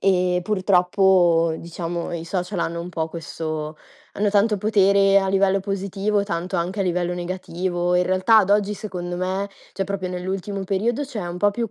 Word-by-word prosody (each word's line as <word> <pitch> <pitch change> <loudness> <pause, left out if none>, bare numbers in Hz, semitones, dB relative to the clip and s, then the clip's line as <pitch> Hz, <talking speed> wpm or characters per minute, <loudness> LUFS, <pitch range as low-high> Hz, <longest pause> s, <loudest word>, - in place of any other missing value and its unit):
e 180 -2 +2
purtroppo, 180 -3 +3
diciamo, 170 0 -5
i 165 -1 -4
social 180 +1 -3
hanno 170 0 -2
un 175 - -6
po' 160 -2 -2
questo 155 -2 -5 0.4
hanno 205 0 +2
tanto 210 +1 +3
potere 200 -1 +4
a 195 -1 0
livello 195 0 +2
positivo, 200 +1 -1
tanto 180 -1 -3
anche 180 +4 -2
a - - +3
livello 180 -1 0
negativo. 180 0 -2
In 180 0 +3
realtà 185 +5 +4
ad 195 -2 +3
oggi, 205 0 +2
secondo 180 -4 -5
me, 190 +2 -1 0.3
cioè, 195 - -1
proprio 190 -1 -3
nell'ultimo 190 +2 -4
periodo, 220 +8 0
c'è 250 -6 -6
un 175 - -5
po' 205 +3 +3
più 230 +1 -3
185 Hz, 175 wpm, -22 LUFS, 175-200 Hz, 0.4 s, potere